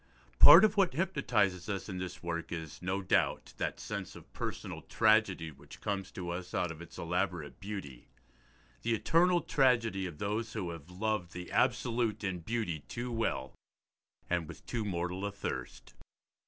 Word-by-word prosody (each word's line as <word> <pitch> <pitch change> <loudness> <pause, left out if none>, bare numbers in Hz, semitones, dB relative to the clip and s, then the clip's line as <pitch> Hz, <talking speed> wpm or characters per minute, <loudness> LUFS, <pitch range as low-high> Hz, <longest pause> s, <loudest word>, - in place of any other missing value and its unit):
Part 165 +8 +11
of 215 0 +1
what 190 -7 +4
hypnotises 120 - +1
us 100 -2 -3
in 95 -2 -4
this 90 -1 -6
work 85 -1 -3
is, 80 -2 -6
no 95 +2 -1
doubt, 95 - +1
that - - -2
sense 100 -3 -5
of - - -14
personal - - -5
tragedy 110 -7 +3
which 70 0 -14
comes 100 -3 -2
to 90 -2 -4
us 90 +1 -5
out 90 - 0
of 80 0 -9
its 85 - -11
elaborate 90 -3 -2
beauty: 95 -11 -7 0.7
the 115 0 +1
eternal 175 +8 +3
tragedy 115 -8 +2
of 80 -4 -9
those 110 +5 -2
who 95 -6 -3
have 85 -1 -9
loved 100 -1 -2
the 90 0 -7
absolute 120 -4 +1
in 95 -3 -1
beauty 105 -3 -2
too 120 +11 -5
well, 110 - -1 0.7
and 85 -3 0
with - - -11
too 115 -3 -2
mortal 90 -1 -2
a 100 - -1
thirst. 65 -10 -6
95 Hz, 165 wpm, -32 LUFS, 85-115 Hz, 0.7 s, Part